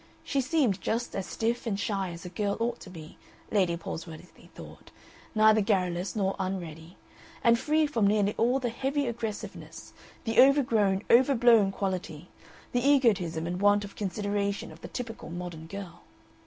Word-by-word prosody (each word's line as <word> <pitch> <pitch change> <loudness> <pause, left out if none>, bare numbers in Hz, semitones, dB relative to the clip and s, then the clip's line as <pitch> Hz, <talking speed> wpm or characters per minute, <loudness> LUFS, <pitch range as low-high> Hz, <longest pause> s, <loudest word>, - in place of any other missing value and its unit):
She 275 - 0
seemed 255 - +1
just 230 +7 -2
as 195 - -3
stiff 230 +2 -2
and 200 -3 -1
shy 195 -2 -1
as 170 +2 -9
a - - -5
girl 200 +1 -2
ought 235 +1 -1
to - - -11
be, 160 -4 -11 0.3
Lady 185 -5 +2
Palsworthy 165 0 -9
thought, - - -12 0.5
neither 215 0 +5
garrulous 185 -2 0
nor 195 -2 0
unready, 175 -3 -5 0.5
and 235 0 +5
free 310 +2 +2
from 230 -9 +1
nearly 205 0 +2
all 245 +3 +2
the 255 -3 -2
heavy 275 +4 -1
aggressiveness, 230 -3 -6 0.3
the 225 +1 +4
overgrown, 225 -8 +3
overblown 235 -5 +5
quality, 180 -4 -4 0.4
the 245 - +1
egotism 205 - +2
and 180 +2 -3
want 205 0 +4
of 200 - -12
consideration 200 -1 -2
of 160 +1 -14
the - - -7
typical 230 -3 -7
modern 170 -2 -7
girl. 195 -1 -8
205 Hz, 155 wpm, -28 LUFS, 180-235 Hz, 0.5 s, neither